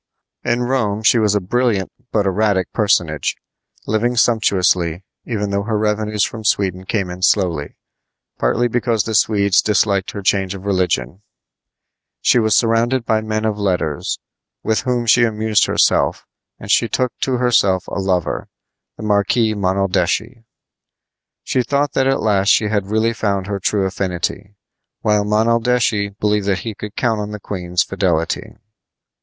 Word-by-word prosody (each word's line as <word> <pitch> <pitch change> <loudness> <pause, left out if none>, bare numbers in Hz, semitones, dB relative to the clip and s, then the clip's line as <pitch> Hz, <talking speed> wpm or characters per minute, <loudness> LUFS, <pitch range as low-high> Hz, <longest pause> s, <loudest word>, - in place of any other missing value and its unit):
In 120 +1 0
Rome 115 -5 -1
she 115 +2 +4
was 105 -2 +2
a - - +3
brilliant 105 0 0 0.2
but 105 -2 +1
erratic 95 -1 0
personage, 85 - 0 0.5
living 120 +3 0
sumptuously, 95 -7 +2 0.2
even 105 -4 -3
though 100 0 0
her 110 +1 -2
revenues 105 0 0
from 110 -2 -7
Sweden 95 -3 0
came 95 -2 -2
in 90 +1 -8
slowly, 90 -6 +1 0.6
partly 115 - +1
because 120 -2 0
the 110 - -4
Swedes 100 -2 +3
disliked 100 -2 +1
her 100 - -7
change 95 0 +1
of 95 0 -10
religion. 90 -5 -1 1.0
She 125 - +3
was 110 -1 +2
surrounded 115 +2 +2
by 110 0 +1
men 110 0 -2
of 105 -1 -1
letters, 90 -7 -1 0.5
with 110 0 +1
whom 125 -2 -1
she 120 +1 +5
amused 110 -1 +1
herself, - - +2 0.3
and - - -5
she - - +3
took 125 -1 0
to 130 - -1
herself 115 -7 +2
a - - -4
lover, 90 -3 -1 0.5
the - - -8
Marquis 110 +2 +2
Monaldeschi. 100 +4 -1 1.0
She 130 - 0
thought 140 +2 0
that 135 0 +2
at 135 - +1
last 100 -3 +1
she 105 0 +3
had 105 -2 -1
really 110 +2 +1
found 100 -4 -1
her 100 -1 -3
true 100 +1 0
affinity, 95 +1 -3 0.5
while 105 -1 +2
Monaldeschi 110 0 +1
believed 105 -1 0
that 95 -2 0
he 110 - -3
could 105 +1 -9
count 115 -4 0
on 105 - -5
the 105 0 -6
queen's 90 -3 -2
fidelity. 90 -4 -2
105 Hz, 150 wpm, -18 LUFS, 95-115 Hz, 1.0 s, she